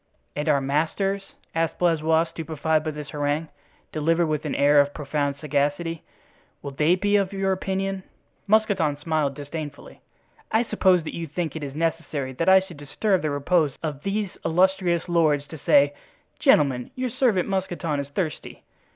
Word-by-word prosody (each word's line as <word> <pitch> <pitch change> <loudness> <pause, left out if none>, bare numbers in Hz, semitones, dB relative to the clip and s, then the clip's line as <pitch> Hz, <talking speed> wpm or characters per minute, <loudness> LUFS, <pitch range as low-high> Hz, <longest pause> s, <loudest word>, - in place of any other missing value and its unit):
"And 150 +2 -1
our 145 -2 +4
masters?" 165 +8 -1 0.2
asked 165 0 -1
Blaisois, 160 -2 +3
stupefied 160 -1 -1
by 155 - -2
this 150 -2 -7
harangue, 145 +2 -1 0.4
delivered 165 +2 +1
with 155 -1 -2
an 150 - -2
air 145 0 +5
of 145 0 -3
profound 145 -1 -1
sagacity, 150 +3 -1 0.6
"will 140 - -5
they 150 +5 +3
be 205 +2 +2
of 195 -1 0
your 195 0 0
opinion?" 190 0 -2 0.5
Mousqueton 200 -8 +2
smiled 150 -2 -1
disdainfully. 145 0 -8 0.5
"I 220 +2 +3
suppose 190 -6 +3
that 155 - -6
you 165 -1 -4
think 155 0 -3
it 145 -3 -5
necessary 155 -4 -2
that 165 +8 +1
I 190 0 +7
should 185 -4 -11
disturb 185 +7 0
the 155 - -1
repose 145 +1 +1
of 150 -3 -3
these 200 +1 -2
illustrious 180 0 +2
lords 155 -4 +2
to 160 - -9
say, 285 - +4 0.5
'Gentlemen, 140 - +3
your 255 -1 -2
servant, 220 -8 +2
Mousqueton, 180 -6 -2
is 140 - -4
thirsty. 155 +1 -4
160 Hz, 160 wpm, -24 LUFS, 145-190 Hz, 0.6 s, I